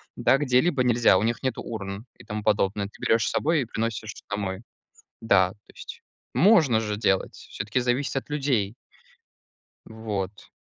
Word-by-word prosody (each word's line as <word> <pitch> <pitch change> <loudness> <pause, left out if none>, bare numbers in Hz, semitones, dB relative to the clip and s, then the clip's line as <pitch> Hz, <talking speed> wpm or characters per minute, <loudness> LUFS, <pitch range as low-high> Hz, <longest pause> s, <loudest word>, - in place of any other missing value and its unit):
да, 135 - +3
где-либо 135 +1 +2
нельзя. 120 -5 +4
У 95 - 0
них 115 +3 -1
нету 130 - -2
урн, 100 -1 -6
и - - -14
тому 105 -1 -5
подобное. 100 -1 +1
Ты 100 - -18
берешь 115 -1 +2
с - - -1
собой 160 0 +1
и - - -2
приносишь 110 -1 -3 0.2
домой. 100 -1 -3 0.6
Да, 95 -4 +3
то 105 +1 -21
есть - - -10 0.3
можно 160 - +5
же 105 -2 -3
делать. 95 -3 0
Всё-таки 105 +5 -4
зависит 125 +3 -1
от 135 - -5
людей. 135 -9 0 1.1
Вот. 105 -3 -5
110 Hz, 160 wpm, -25 LUFS, 100-125 Hz, 1.1 s, можно